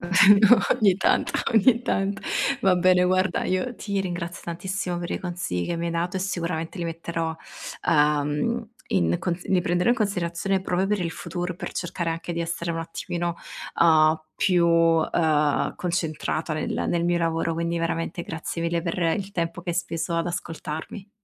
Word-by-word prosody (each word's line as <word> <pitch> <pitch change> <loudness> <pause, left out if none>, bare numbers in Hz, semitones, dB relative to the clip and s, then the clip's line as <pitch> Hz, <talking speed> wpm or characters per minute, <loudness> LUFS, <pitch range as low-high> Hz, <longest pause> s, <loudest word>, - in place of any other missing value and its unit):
Vero, 200 +5 +6 0.2
ogni 205 -7 +4
tanto, 190 - +2 0.2
ogni 230 +2 +4
tanto. 195 -4 -1 0.4
Va 190 -2 +4
bene 180 0 +4
guarda, 185 0 +2
io 185 +7 -1
ti 200 -4 -2
ringrazio 175 -2 -4
tantissimo 180 +2 -3
per 175 0 -5
i - - -1
consigli 175 - -3
che 170 - -2
mi 170 +1 -2
hai - - -1
dato 170 +2 -2
e 185 - -2
sicuramente 170 -2 -3
li 170 - -2
metterò, 165 0 -3 0.5
uhm, 150 +9 +2 0.2
in 85 -2 +2
consi 175 0 -3
li 185 -2 +4
prenderò 175 +5 +1
in 245 - +3
considerazione 195 -3 -1
proprio 185 0 0
per 205 0 0
il 170 -2 -1
futuro, 175 +1 -5
per - - -6
cercare 170 -1 -3
anche 165 +1 -4
di 170 - -3
essere 170 0 -3
un 165 - -2
attimino, 170 +1 -3 0.5
uhm, 155 -1 +5 0.2
più, 180 -3 +3
ehm, 165 -2 +2
concentrata 165 -2 -2
nel 155 0 -2
nel 170 -1 +1
mio 175 0 +2
lavoro. 165 0 0
Quindi 170 +1 -1
veramente 165 +1 -2
grazie 165 0 -5
mille 170 0 0
per 170 -1 -2 0.2
il 200 -1 -6
tempo 170 0 -3
che 175 - -3
hai - - -2
speso 170 -1 -2
ad 165 +1 0
ascoltarmi. 170 +3 -6
170 Hz, 170 wpm, -25 LUFS, 165-185 Hz, 0.5 s, Vero